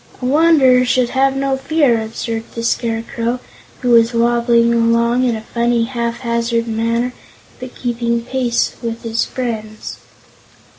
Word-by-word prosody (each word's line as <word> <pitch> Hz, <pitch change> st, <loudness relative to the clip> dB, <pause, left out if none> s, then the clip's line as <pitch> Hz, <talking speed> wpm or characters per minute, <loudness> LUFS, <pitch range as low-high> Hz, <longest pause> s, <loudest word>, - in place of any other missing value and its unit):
"A 250 Hz, -, -5 dB
Wanderer 275 Hz, -3 st, +4 dB
should 245 Hz, 0 st, +1 dB
have 270 Hz, +1 st, +1 dB
no 270 Hz, 0 st, 0 dB
fear," 265 Hz, -4 st, +1 dB
observed 225 Hz, +1 st, -5 dB
the 230 Hz, -, -4 dB
Scarecrow, 230 Hz, +1 st, -2 dB, 0.4 s
who 250 Hz, -2 st, +1 dB
was 230 Hz, 0 st, +4 dB
wobbling 235 Hz, 0 st, +3 dB
along 235 Hz, +1 st, +2 dB
in 240 Hz, -2 st, +1 dB
a 220 Hz, -, -6 dB
funny, 235 Hz, 0 st, 0 dB
haphazard 235 Hz, -1 st, -2 dB
manner, 230 Hz, +2 st, -1 dB, 0.5 s
but 255 Hz, 0 st, -9 dB
keeping 235 Hz, -1 st, -2 dB
pace 250 Hz, -2 st, 0 dB
with 230 Hz, -1 st, -5 dB
his 230 Hz, 0 st, -1 dB
friends. 220 Hz, -4 st, -5 dB
235 Hz, 135 wpm, -17 LUFS, 230-250 Hz, 0.5 s, Wanderer